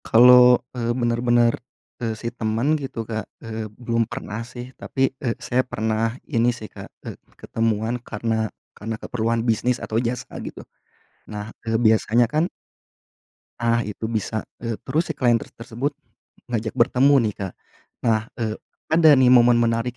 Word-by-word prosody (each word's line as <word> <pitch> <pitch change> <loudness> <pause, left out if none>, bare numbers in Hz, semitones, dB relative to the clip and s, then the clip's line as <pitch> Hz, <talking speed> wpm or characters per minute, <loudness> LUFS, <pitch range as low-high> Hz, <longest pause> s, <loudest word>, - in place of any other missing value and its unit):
Kalau, 125 +1 +8
eee, 120 -2 -1
bener-bener, 120 0 +2 0.5
eee, 110 -2 -2
si 115 - -5
temen 115 +5 0
gitu 135 -6 -5
Kak, 110 -1 -5 0.2
eee, 110 -1 -5 0.2
belum 115 -1 +1
pernah 105 +3 -5
sih 120 +2 -9
tapi, 135 0 -1
eee, 120 -4 -1
saya 125 +1 +3
pernah 110 -1 -1
ini 120 -4 +2
sih 115 -2 -4
Kak, - - -10 0.2
eee, - - -5 0.2
ketemuan 115 +1 -1
karena 110 -1 -2 0.2
karena 110 +2 -5
keperluan 115 0 -1
bisnis 120 +2 +1
atau 110 +1 0
jasa 125 +1 -3
gitu. - - -8 0.6
Nah, 105 +1 -6 0.2
eee, 110 - +2
biasanya 110 +1 +3
kan 155 +9 0 1.1
Ah 115 0 +2
itu 105 +1 -5
bisa, 110 -1 -2 0.2
eee, 115 -2 -3
terus 160 +3 0
si - - -6
klien 120 -2 +4
ter 115 - -3
tersebut 120 +5 -4 0.6
ngajak 110 -2 -2
bertemu 130 +3 +4 0.2
nih, - - -12
Kak. 95 -3 -4 0.5
Nah, 110 -2 +3 0.2
eee, 110 -2 -2 0.4
ada 160 -1 +7
nih 130 -1 +5
momen 120 -1 +6
menarik 115 +1 0
115 Hz, 155 wpm, -23 LUFS, 110-125 Hz, 1.1 s, Kalau